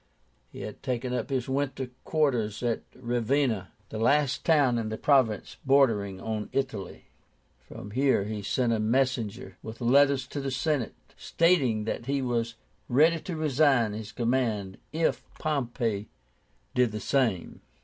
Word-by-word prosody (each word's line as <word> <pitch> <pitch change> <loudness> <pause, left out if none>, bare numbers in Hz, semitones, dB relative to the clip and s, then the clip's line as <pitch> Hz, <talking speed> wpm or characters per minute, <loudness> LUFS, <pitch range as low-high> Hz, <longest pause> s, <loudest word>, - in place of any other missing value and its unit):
He - - -10
had 105 - -7
taken 125 -1 -2
up 125 - -2
his 130 -3 -1
winter 135 -1 -2
quarters 125 -9 0
at 120 -2 0
Ravenna, 120 -3 0 0.2
the 110 - -5
last 140 +3 +2
town 140 -7 +3
in 110 -1 -3
his 110 - -5
province 130 -8 +2
bordering 115 -9 +3
on 110 0 -4
Italy. 130 -9 -3 0.5
From 100 - -10
here 130 -2 +2
he 105 0 -4
sent 115 +4 +1
a 110 - 0
messenger 125 0 -1
with 110 0 -8
letters 135 +2 +4
to 145 - -4
the 135 - -2
Senate, 135 -1 -1 0.2
stating 140 -11 +2
that 115 +2 -4
he 140 0 +1
was 115 -2 -1 0.3
ready 160 +6 +4
to 175 +1 -5
resign 140 -7 +3
his 110 0 -6
command, 115 -6 -1
if 160 +1 0
Pompey 120 -8 -2 0.6
did 125 -2 +3
the 105 - -4
same. 115 -7 0
125 Hz, 145 wpm, -28 LUFS, 110-140 Hz, 0.6 s, letters